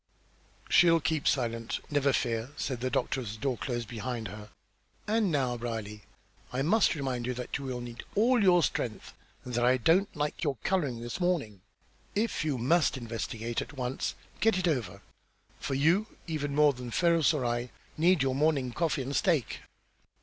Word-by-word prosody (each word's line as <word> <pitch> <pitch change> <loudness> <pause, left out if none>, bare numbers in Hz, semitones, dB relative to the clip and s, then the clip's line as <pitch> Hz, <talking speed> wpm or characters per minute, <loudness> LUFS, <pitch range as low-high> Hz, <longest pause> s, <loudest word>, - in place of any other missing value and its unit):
"She'll 165 -1 +6
keep 160 -1 -1
silent, 115 -3 0
never 145 -1 +3
fear," 115 -2 -1
said 130 -4 -3
the 130 - 0
doctor 130 +1 0
as 110 -4 -5
the - - -8
door 135 0 0
closed 120 -1 -3
behind 115 0 -4
her. 105 0 -9 0.6
"And 215 -3 +1
now, 130 -5 0
Brierly, 110 -3 -5 0.5
I 130 +2 -1
must 205 +4 +3
remind 130 -4 -2
you 125 - -2
that 125 0 -5
you 135 - -6
will 125 -2 -3
need 120 -1 -7
all 235 +3 +4
your 180 -3 +5
strength, 115 -5 -2 0.3
and 125 - -6
that 120 +1 +1
I 125 +1 +4
don't 175 - +2
like 150 +3 -2
your 145 -4 0
colour 180 -8 +1
this 120 +6 -6
morning. 145 - 0 0.5
If 215 -4 0
you 150 -4 0
must 140 +4 +2
investigate 115 -1 -3
at - - -8
once, 130 -1 -3 0.2
get 225 -3 +3
it 180 -1 0
over, 105 - -2 0.6
for 135 - -2
you, 170 +10 +3 0.2
even 145 -4 -3
more 150 -1 +5
than 125 -1 -7
Ferrars 165 +2 +3
or 145 -6 -1
I, 120 +1 -1 0.3
need 170 -1 +4
your 135 -1 +1
morning 140 -3 +1
coffee 155 +1 0
and 140 +2 -4
steak." 160 - +1
135 Hz, 180 wpm, -30 LUFS, 120-160 Hz, 0.6 s, She'll